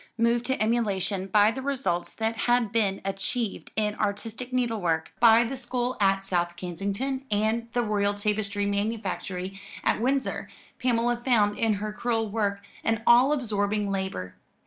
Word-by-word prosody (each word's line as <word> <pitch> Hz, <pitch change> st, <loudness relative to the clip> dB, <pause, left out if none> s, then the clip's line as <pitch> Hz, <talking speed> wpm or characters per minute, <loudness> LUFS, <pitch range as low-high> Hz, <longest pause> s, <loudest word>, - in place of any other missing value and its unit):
Moved 235 Hz, +1 st, +2 dB
to 265 Hz, -, 0 dB
emulation 205 Hz, -4 st, 0 dB
by 210 Hz, +2 st, +5 dB
the 265 Hz, -, -5 dB
results 260 Hz, -10 st, -2 dB
that 225 Hz, 0 st, -1 dB
had 240 Hz, -1 st, +2 dB
been 205 Hz, -4 st, +1 dB
achieved 195 Hz, +3 st, -3 dB
in 210 Hz, -1 st, +1 dB
artistic 225 Hz, +4 st, -3 dB
needle 240 Hz, -4 st, 0 dB
work 160 Hz, -2 st, -1 dB
by 230 Hz, 0 st, +7 dB
the 245 Hz, +3 st, -3 dB
school 250 Hz, 0 st, -2 dB
at 195 Hz, -1 st, +3 dB
South 175 Hz, -2 st, 0 dB
Kensington 200 Hz, +10 st, -3 dB
and 220 Hz, +3 st, 0 dB
the 245 Hz, -, +1 dB
Royal 205 Hz, -2 st, +1 dB
Tapestry 205 Hz, 0 st, -1 dB
Manufactory 200 Hz, -2 st, -3 dB, 0.2 s
at -, -, +1 dB
Windsor, 265 Hz, +2 st, 0 dB, 0.3 s
Pamela 240 Hz, -1 st, +1 dB
found 230 Hz, -4 st, +2 dB
in 225 Hz, -2 st, +1 dB
her 210 Hz, +1 st, -4 dB
crewel 225 Hz, -1 st, -1 dB
work 200 Hz, -2 st, 0 dB, 0.2 s
an 225 Hz, 0 st, 0 dB
all 245 Hz, +4 st, +6 dB
absorbing 210 Hz, -6 st, 0 dB
labour. 190 Hz, -, -3 dB
215 Hz, 150 wpm, -27 LUFS, 200-240 Hz, 0.3 s, by